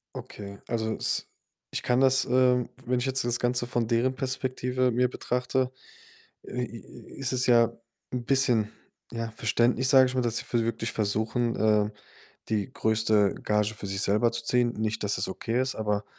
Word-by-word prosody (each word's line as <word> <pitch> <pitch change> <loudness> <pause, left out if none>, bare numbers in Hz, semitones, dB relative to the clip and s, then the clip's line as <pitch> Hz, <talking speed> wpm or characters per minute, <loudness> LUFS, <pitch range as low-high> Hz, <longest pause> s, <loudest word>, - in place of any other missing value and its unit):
Okay, 100 -1 -8
also, 110 -1 -1
es - - -1 0.4
ich - - -3
kann 125 +1 +2
das, 135 0 +4
ähm 125 -1 +3 0.2
wenn 125 0 +1
ich 125 - -2
jetzt 135 -1 0
das 120 0 +1
Ganze 120 0 0
von 120 -2 0
deren 120 +3 +1
Perspektive 130 -1 -1
mir 125 +1 +2
betrachte, 125 +1 -1 0.7
äh, 125 - -4
i 115 -1 -8 0.3
i - - -11
ist 135 -1 -2
es 125 0 0
ja 115 -1 +5 0.4
'n 125 -1 -2
bisschen, 120 -5 +2 0.4
ja, 115 -1 -4
verständlich, 120 +4 +1
sage 135 -2 +7
ich 130 0 -3
mal, 130 - +2
dass 115 -1 -1
sie - - -4
v 120 - 0
wirklich 115 0 -2
versuchen, 110 +3 0
ähm, 105 -1 +3 0.6
die 110 +3 -1
größte 110 -3 +2
Gage 105 0 +1
für 100 - -7
sich 95 0 -3
selber 105 +4 +2
zu 115 - -4
ziehen. 120 0 +2
Nicht, 110 -1 -1
dass 100 -1 0
es 95 - -1
okay 115 +5 -2
ist, 130 0 -1
aber 105 -1 -1
120 Hz, 185 wpm, -27 LUFS, 110-125 Hz, 0.7 s, sage